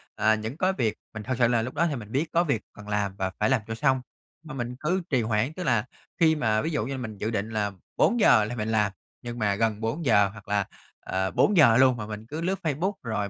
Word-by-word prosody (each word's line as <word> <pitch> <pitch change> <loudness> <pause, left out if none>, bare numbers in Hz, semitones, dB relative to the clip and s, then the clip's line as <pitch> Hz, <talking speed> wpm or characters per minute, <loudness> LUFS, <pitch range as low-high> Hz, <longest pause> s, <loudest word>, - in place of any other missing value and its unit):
à, 110 +1 +3
những 110 +7 -5
cớ 190 +1 +1
việc 110 -4 0 0.2
mình 110 -1 -6
thực 130 +1 -2
sự 120 -2 +4
là 115 -2 +2
lúc 125 +3 -5
đó 170 - +2
thì 145 - -2
mình 110 -3 -8
biết 150 +5 0
có 170 +1 +3
việc 135 -10 0
cần 105 0 -12
làm 100 -2 -1
và 95 -1 -2
phải - - +2
làm 130 -5 +2
cho 115 - -4
xong 130 -1 +2 0.4
mà 150 -3 -9
mình 125 -1 -4
cứ 180 +5 0
trì 130 -5 +2
hoãn. 110 +6 0
Tức 180 - -5
là 115 -6 +1 0.3
khi 160 -1 +5
mà 110 -7 +1
ví 160 - -2
dụ 115 -9 -1
như 135 - -5
là - - -4
mình 110 -3 -6
dự 110 +3 -2
định 105 0 -2
là 105 -2 -1 0.3
4:00 125 - +5
là 120 - -5
mình 110 -1 -3
làm, 105 -2 +2 0.3
nhưng 120 0 -6
mà 105 -2 +1
gần 110 0 0
4:00 115 - +2
hoặc 105 -1 -14
là, 100 -1 +1 0.3
ờ, 95 0 -2
4:00 150 - +5
luôn 130 -2 +5
mà 105 - -5
mình 105 0 -7
cứ 155 +6 -5
lướt 190 +3 -1
Facebook, 165 +6 0
rồi 105 -3 -2
115 Hz, 260 wpm, -26 LUFS, 105-140 Hz, 0.4 s, khi